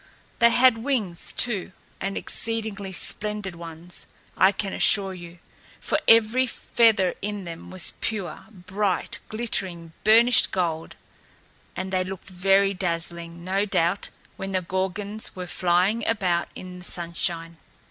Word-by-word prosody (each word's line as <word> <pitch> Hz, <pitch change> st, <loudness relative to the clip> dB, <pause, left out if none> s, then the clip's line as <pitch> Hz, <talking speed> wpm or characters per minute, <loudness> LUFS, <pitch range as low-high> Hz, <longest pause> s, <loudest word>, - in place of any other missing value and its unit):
They 235 Hz, -, +7 dB
had 245 Hz, -1 st, +5 dB
wings, 225 Hz, -9 st, -1 dB
too, 205 Hz, -6 st, 0 dB, 0.3 s
and 195 Hz, 0 st, -3 dB
exceedingly 220 Hz, -4 st, -2 dB
splendid 210 Hz, +1 st, -1 dB
ones, 170 Hz, +1 st, -10 dB, 0.3 s
I 190 Hz, +2 st, +5 dB
can 200 Hz, -1 st, -4 dB
assure 195 Hz, -2 st, +3 dB
you, 175 Hz, -1 st, -10 dB, 0.4 s
for -, -, 0 dB
every 230 Hz, +3 st, +5 dB
feather 225 Hz, -6 st, +2 dB
in 205 Hz, 0 st, -4 dB
them 170 Hz, -2 st, -8 dB
was 185 Hz, -2 st, +4 dB
pure, 210 Hz, -4 st, -4 dB
bright, 195 Hz, -1 st, -2 dB
glittering, 185 Hz, -7 st, -3 dB
burnished 230 Hz, +3 st, +5 dB
gold; 165 Hz, -3 st, -2 dB, 0.8 s
and 190 Hz, 0 st, -4 dB
they 185 Hz, 0 st, +2 dB
looked 190 Hz, +1 st, -8 dB
very 195 Hz, +2 st, +3 dB
dazzling, 170 Hz, -2 st, -3 dB
no 190 Hz, +2 st, 0 dB
doubt, 195 Hz, -1 st, 0 dB, 0.3 s
when 195 Hz, -, -5 dB
the 185 Hz, -1 st, 0 dB
Gorgons 190 Hz, +4 st, -3 dB
were 180 Hz, -1 st, -5 dB
flying 180 Hz, +6 st, +1 dB
about 185 Hz, -6 st, +1 dB
in 180 Hz, 0 st, -9 dB
the 180 Hz, -, -12 dB
sunshine. 170 Hz, -1 st, -3 dB
190 Hz, 130 wpm, -25 LUFS, 175-210 Hz, 0.8 s, They